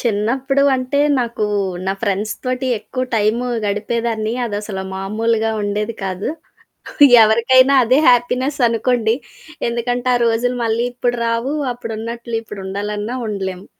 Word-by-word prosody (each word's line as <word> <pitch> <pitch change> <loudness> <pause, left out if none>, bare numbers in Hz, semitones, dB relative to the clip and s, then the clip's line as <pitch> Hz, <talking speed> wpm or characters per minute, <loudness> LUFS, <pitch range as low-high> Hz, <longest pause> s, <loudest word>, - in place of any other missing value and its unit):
చిన్నప్పుడు 255 +5 0
అంటే, 255 +2 0 0.2
నాకు 235 -3 -2 0.4
నా 190 - +1
ఫ్రెండ్స్ 210 +1 -1
తోటి 255 +1 -2
ఎక్కువ 220 +5 -5
టైము 220 +4 +1 0.2
గడిపేదాన్ని, 220 +2 -1
అదసలా 205 -2 -4
మామూలుగా 220 +3 0
ఉండేది 210 +2 -2
కాదు. 190 0 -3 1.0
ఎవరికైనా 255 +5 +4
అదే 250 +3 +3
హ్యాపీనెస్ 250 +3 +1
అనుకోండి. 230 0 +1 0.5
ఎందుకంటే 245 +1 -2
ఆ - - +3
రోజులు 235 +2 +1
మళ్ళీ 230 +1 0
ఇప్పుడు 245 0 -1
రావు, 230 +5 -1 0.2
అప్పుడున్నట్లు 230 0 -5
ఇప్పుడు 210 -3 -9
ఉండాలన్నా 210 +4 -4
ఉండలేము. 190 -2 -4
230 Hz, 115 wpm, -18 LUFS, 210-245 Hz, 1.0 s, ఎవరికైనా